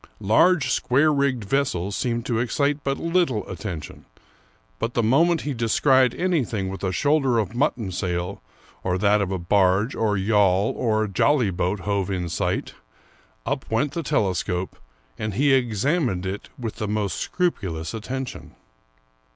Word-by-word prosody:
Large 130 - +4
square 145 +6 +3
rigged 140 -5 0
vessels 100 -5 -1
seemed 120 -1 -2
to 115 -3 0
ex 120 - -3
cite 145 0 +1
but 135 0 -1
little 165 - 0
attention; 85 -4 -7 0.7
but 115 - -3
the 120 - +2
moment 160 +9 +3
he 145 - -3
descried 130 +2 +3
anything 125 - -1
with 95 +1 -7
a 95 - 0
shoulder 140 - +2
of 110 -2 -1
mutton 120 -4 0
^ - - -6
sail, 90 +1 -3 0.4
or 90 -1 0
that 105 +2 +3
a 100 - 0
barge 95 +4 +2
or 105 -2 0
yawl 100 -1 +2
or 110 -2 +1
jolly 115 +3 +2
boat 90 +3 -1
hove 100 -2 -1
in 90 -3 -2
sight, - - -2 0.7
up - - -3
went 115 +6 +1
the 170 - -3
telescope, 95 - -1 0.4
and 110 -2 -3
he 140 +3 +3
ex 120 -4 +1
amined 130 - +1
it 95 +2 -5
with 115 -4 -5
the 105 - -3
most 105 -3 -1
scrupulous 95 - -2
attention. 130 +4 -6
110 Hz, 155 wpm, -23 LUFS, 95-135 Hz, 0.7 s, Large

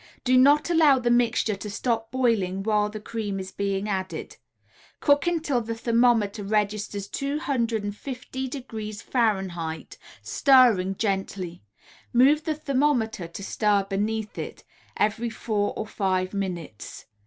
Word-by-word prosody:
Do 255 0 +3
not 285 +6 +5
allow 310 -5 +5
the 240 -1 +1
mixture 235 -3 +2
to 200 +2 -7
stop 225 +2 -1
boiling 215 -7 0
while 210 -1 +2
the 215 0 -7
cream 210 -2 -4
is 190 0 -6
being 200 0 -2
added. 190 -2 -4 0.6
Cook 285 +1 +3
until 315 -7 +1
the 230 0 -4
thermometer 230 -3 +2
registers 205 -1 -1
250° 230 - -3
F., - - -11 0.3
stirring 235 -9 +4
gently 190 -4 -3 0.5
move 280 +5 +5
the 315 - 0
thermometer, 260 - 0
to 170 +4 -9
stir 205 0 +1
beneath 210 +2 -3
it - - -7 0.3
every 220 +3 0
four 215 -2 -1
or 215 - -3
five 185 -3 -1
minutes. 175 - -5
220 Hz, 120 wpm, -25 LUFS, 200-250 Hz, 0.6 s, not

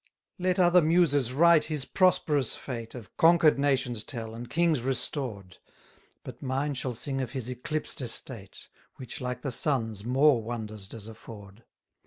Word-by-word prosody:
90 185 +1 0
Let 180 - +6
other 175 +1 +6
muses 155 -6 +3
write 165 +3 +5
his 150 -4 -2
prosperous 150 - +2
fate, 115 -3 -7
Of 115 -4 -11
conquer'd 165 -3 +5
nations 130 -5 +1
tell, 115 -3 -6
and 120 +1 -8
kings 165 -2 +2
restored; 120 - -3 0.7
But - - -10
mine 135 +2 -1
shall 130 -2 -4
sing 135 +3 -2
of 125 -1 -5
his 130 -3 -4
eclipsed 145 +5 -3
estate, 115 -4 -7 0.3
Which, 130 -1 -8
like 125 -1 -4
the 135 - -2
sun's, 115 -6 -1
more 130 +1 +4
wonders 110 -3 -6
does 110 0 -9
afford. 110 -1 -12
130 Hz, 155 wpm, -28 LUFS, 115-150 Hz, 0.7 s, Let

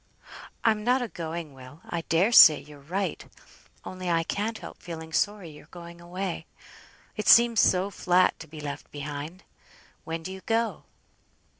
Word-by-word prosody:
"I'm 215 -2 +2
not 250 +2 +2
a - - -3
going, 165 -5 -6
Will. 130 +3 -14
I 170 - -3
dare 180 +7 +3
say 155 -10 +9
you're 145 +1 -14
right; 185 +8 -3 0.6
only 185 -1 -5
I 165 -1 +2
can't 215 +6 -3
help - - -11
feeling 160 -2 -8
sorry 205 -4 -1
you're 150 - -15
going 170 -1 -12
away. 180 +1 -5 0.7
It 215 - -4
seems 235 -1 +6
so 185 +2 +3
flat 180 -1 +2
to 160 - -10
be 155 0 -11
left 145 -1 -7
behind. 145 +5 -7 0.6
When 165 0 -5
do 185 - -6
you 190 0 -9
go?" 225 0 -1
170 Hz, 160 wpm, -26 LUFS, 160-200 Hz, 0.7 s, say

